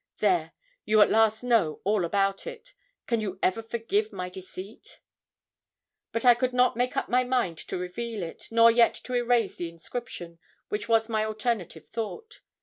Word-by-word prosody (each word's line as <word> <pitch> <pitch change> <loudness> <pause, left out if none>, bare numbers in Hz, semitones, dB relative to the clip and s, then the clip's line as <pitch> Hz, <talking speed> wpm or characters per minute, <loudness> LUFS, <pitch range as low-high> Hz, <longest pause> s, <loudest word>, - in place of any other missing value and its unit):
There 360 - +1 0.3
you 215 0 +3
at - - 0
last 220 +1 +3
know 225 -11 +2
all 200 -2 +1
about 195 +2 0
it. - - -9 0.3
Can 230 -2 0
you 195 -3 -4
ever 190 +5 +2
forgive 235 - -1
my 180 0 -5
deceit?' 190 +3 -10 1.1
But 230 +2 -2
I 245 - +9
could 250 +1 -1
not 250 -1 +3
make 245 +1 -1
up - - 0
my 250 +1 +3
mind 245 -10 0
to - - -5
reveal 205 +4 -4
it; 165 - -8
nor 230 0 +6
yet 230 0 +4
to 255 - -8
erase 240 -3 +1
the 175 - -4
inscription, 170 -1 -7 0.3
which 210 +2 -3
was 225 -1 +3
my 220 -2 0
alternative 215 -6 -3
thought. 435 - -6
225 Hz, 170 wpm, -27 LUFS, 195-245 Hz, 1.1 s, I